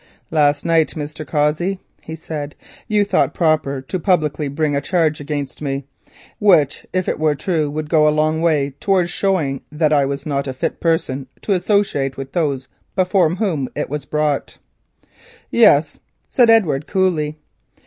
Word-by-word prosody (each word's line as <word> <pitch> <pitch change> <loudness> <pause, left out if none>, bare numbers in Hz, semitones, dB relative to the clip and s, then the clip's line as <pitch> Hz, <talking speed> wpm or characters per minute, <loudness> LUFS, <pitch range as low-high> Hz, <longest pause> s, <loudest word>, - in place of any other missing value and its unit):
"Last 145 -2 +2
night, 165 -2 +2
Mr. 150 0 -6
Cossey," 155 +7 0 0.2
he 160 - -7
said, 150 -2 -6 0.3
"you 210 -2 +2
thought 200 - +1
proper 155 -5 +1
to 185 +7 -4
publicly 155 -5 +1
bring 145 +1 -1
a 140 - 0
charge 160 -1 +1
against 145 -2 -5
me, 140 -2 -3 0.5
which 165 -9 +3
if 185 -1 -1
it - - -1
were 155 -1 +2
true 160 -3 -1
would 155 +1 -4
go 150 -1 +4
a - - +6
long 155 +1 +1
way 150 -4 +1
towards 185 -3 +1
showing 160 -9 0
that 155 0 +1
I 140 -2 +4
was 140 +1 -4
not 140 -2 -2
a 130 - -3
fit 130 - -3
person 140 -5 -1 0.2
to - - -2
associate 185 -8 +1
with 135 0 -6
those 140 -6 -1 0.3
before 185 -2 +3
whom 170 - -1
it - - -3
was 150 -2 -4
brought." 150 -1 -1 0.9
"Yes," - - +4 0.3
said 245 -3 +3
Edward 160 -11 +3
coolly. 165 -6 0
155 Hz, 160 wpm, -19 LUFS, 145-175 Hz, 0.9 s, a